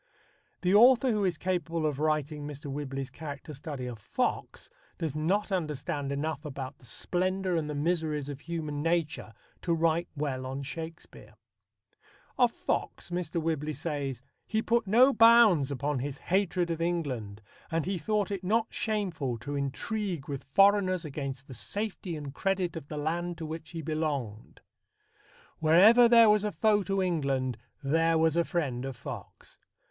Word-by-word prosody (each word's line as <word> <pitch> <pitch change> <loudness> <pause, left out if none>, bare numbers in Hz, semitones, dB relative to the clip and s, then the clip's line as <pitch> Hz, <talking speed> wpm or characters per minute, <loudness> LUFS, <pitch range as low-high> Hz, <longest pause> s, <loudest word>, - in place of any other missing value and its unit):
The 180 +1 +2
author 245 +4 +6
who 210 -2 +1
is 180 -4 +1
capable 170 -3 -1
of 145 -2 -1
writing 150 -1 -1
Mr. 145 -1 -7
Whibley's 135 -1 -4
character 150 0 -7
study 140 -2 -6
of 120 -3 -6
Fox 100 - -2 0.3
does 155 -4 -3
not 190 +7 0
understand 150 -4 -2
enough 155 +4 -2
about 135 -3 -6
the 125 - -14
splendour 185 - -1
and 155 -2 -1
the 150 - -3
miseries 155 -2 -1
of 145 -2 -6
human 155 -2 -4
nature 165 -7 -1 0.3
to 170 -2 +1
write 165 +1 +1
well 130 -3 -2
on 135 +1 -4
Shakespeare. 160 +4 -8 1.0
Of 245 -2 +4
Fox - - -3
Mr. 175 -2 -2
Whibley 155 -2 -1
says: 140 -5 -4 0.2
He 220 0 0
put 235 -2 +1
no 250 +7 +6
bounds 225 - +6
upon 140 0 -1
his 140 +1 -4
hatred 180 -1 0
of 165 0 -3
England, 135 -12 -2 0.3
and 165 -2 -1
he 190 -1 -2
thought 205 +4 0
it 195 -2 -3
not 220 +4 +2
shameful 180 - -1
to 145 +5 -5
intrigue 160 - -3
with 140 -2 -5
foreigners 195 -3 +4
against 140 -2 -5
the 135 - -10
safety 195 - -4
and 145 -3 -7
credit 185 0 -1
of 160 -3 -7
the 150 - -6
land 170 +3 -2
to 165 - -5
which 160 0 -6
he 165 -2 -6
belonged. 145 -9 -3 1.0
Wherever 200 +10 +7
there 230 -1 +8
was 210 -1 +3
a 210 - -1
foe 210 -1 +3
to 195 0 0
England, 140 -8 0 0.3
there 165 +3 +3
was 160 0 +3
a 170 - +3
friend 140 -9 -2
of 135 -1 -5
Fox. - - -9
160 Hz, 160 wpm, -29 LUFS, 145-185 Hz, 1.0 s, there